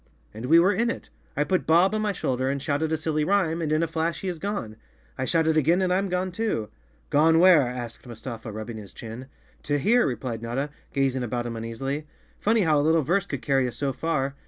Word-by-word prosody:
"And 110 +4 -6
we 165 - +6
were 190 +4 +4
in 230 +5 +1
it. - - -6 0.3
I 145 - +3
put 185 +5 0
Bob 175 +5 +5
on 215 - 0
my 210 -1 +1
shoulder 130 -7 -1
and 140 +1 -1
shouted 145 +3 -1
a 160 - +1
silly 155 -1 -1
rhyme, 170 -2 +1
and 155 -2 -1
in 155 +2 +2
a - - +1
flash 165 +1 -2
he 190 - -2
is 175 -3 -5
gone. 200 - -4 0.4
I 130 - -2
shout 165 +3 +2
it 160 0 +2
again 165 +4 +3
and 185 -1 +1
I'm 195 +1 0
gone 180 +1 -1
too!" 180 - -2 0.4
"Gone 160 +2 +5
where?" 170 -6 +6
asked 120 0 -7
Mustafa, 115 -1 -7
rubbing 110 +2 -6
his 105 -3 -10
chin. 120 +3 -8 0.3
"To 145 0 0
here," 235 - +3
replied 120 -2 -4
Notta, 130 +5 -3 0.2
gazing 135 -2 0
about 120 0 -2
him 120 - -4
uneas¬ 115 +1 -6
ily. 140 +3 -3 0.3
"Funny 220 +1 +2
how 155 -5 +3
a - - +3
little 160 +1 +3
verse 185 +7 +1
could 140 -3 -5
carry 135 -3 +2
us 120 - -6
so 140 -2 -1
far. 140 -4 -1
150 Hz, 235 wpm, -25 LUFS, 125-175 Hz, 0.4 s, we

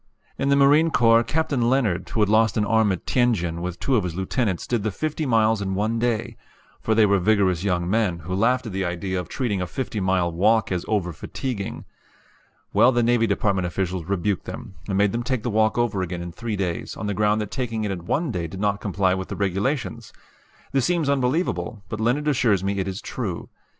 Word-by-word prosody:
In 140 - +1
the 140 - +5
Marine 145 +4 +5
Corps 115 -5 +5
Captain 145 -5 0
Leonard, 110 -9 +1
who 110 - -1
had 105 - +4
lost 110 +1 +3
an 105 - +2
arm 110 -1 +3
at 90 - -4
Tientsin, 90 -10 +1
with 90 0 -4
two 135 - +1
of 110 - +2
his 85 -2 -4
lieutenants 95 +1 -1
did 120 -3 -1
the 110 - -1
fifty 155 - -3
miles 110 -2 +3
in 95 -1 -2
one 110 +3 0
day; 115 -2 -1 0.4
for 110 - +1
they 110 -1 +5
were 100 -1 +3
vigorous 95 -3 +2
young 90 -3 0
men, 100 -3 +1
who 90 +4 -5
laughed 125 +6 +2
at 110 - -5
the 95 0 -2
idea 90 +1 -2
of 90 - -6
treating 110 -8 -1
a 90 - -2
fifty 120 -2 -4
mile 95 -2 +1
walk 105 +6 +2
as 90 -2 -1
over 95 -5 0
fatiguing. 100 - -5 0.9
Well, 125 - +6
the 120 -1 +2
Navy 115 -1 +3
Department 100 -2 0
officials 90 -1 -3
rebuked 100 +1 -1
them, - - -8 0.2
and 95 - 0
made 100 0 +3
them 115 - -2
take 125 -2 -2
the 120 - -1
walk 110 +1 +2
over 115 -5 +1
again 90 -1 -4
in 85 - -6
three 110 +4 -4
days, 90 -5 -3
on 105 - -5
the 105 - -1
ground 105 +1 +2
that 105 -1 -4
taking 115 -5 -2
it 105 - -1
in 90 -2 -6
one 155 -1 0
day 85 -5 -3
did 95 +4 -8
not 100 0 0
comply 95 -2 +1
with 95 0 -3
the - - -5
regulations! 115 +4 -2 0.6
This 135 -1 +1
seems 165 0 +1
unbelievable; 125 - 0
but 110 - -4
Leonard 130 +7 +1
assures 115 -9 +2
me 100 0 -1
it 95 - -1
is 95 +3 -4
true. 100 -9 -5
105 Hz, 220 wpm, -23 LUFS, 95-120 Hz, 0.9 s, Well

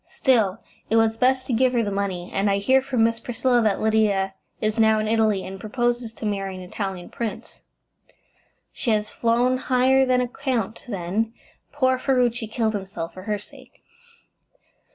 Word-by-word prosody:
Still, 225 -7 +1 0.3
it 225 - +2
was 225 0 +3
best 255 +2 +2
to 255 - -2
give 255 +2 +3
her 235 -2 +2
the 205 - -2
money, 190 -3 -3
and 195 +1 +1
I 200 - +2
hear 260 +7 +3
from 260 -4 0
Miss 230 0 +1
Priscilla 245 +1 +1
that 215 -3 +1
Lydia 210 -3 +2 0.3
is 215 +1 -1
now 220 -1 +5
in 215 0 -1
Italy, 220 -3 +2
and 190 +1 -7
proposes 240 +2 -1
to 225 - -7
marry 195 -2 -2
an 185 - -8
Italian 185 -1 -5
prince." 220 -4 -6 1.1
"She 245 - -3
has 215 -1 +1
flown 240 +2 +2
higher 260 +1 +3
than 255 -1 +2
a 250 - 0
count, 245 -5 -3
then. 210 +3 -2 0.4
Poor 260 -3 +1
Ferruci 245 -3 +1
killed 220 0 -1
himself 190 -4 -5
for 185 - -9
her 210 - +1
sake." 205 - -16
225 Hz, 175 wpm, -23 LUFS, 200-250 Hz, 1.1 s, now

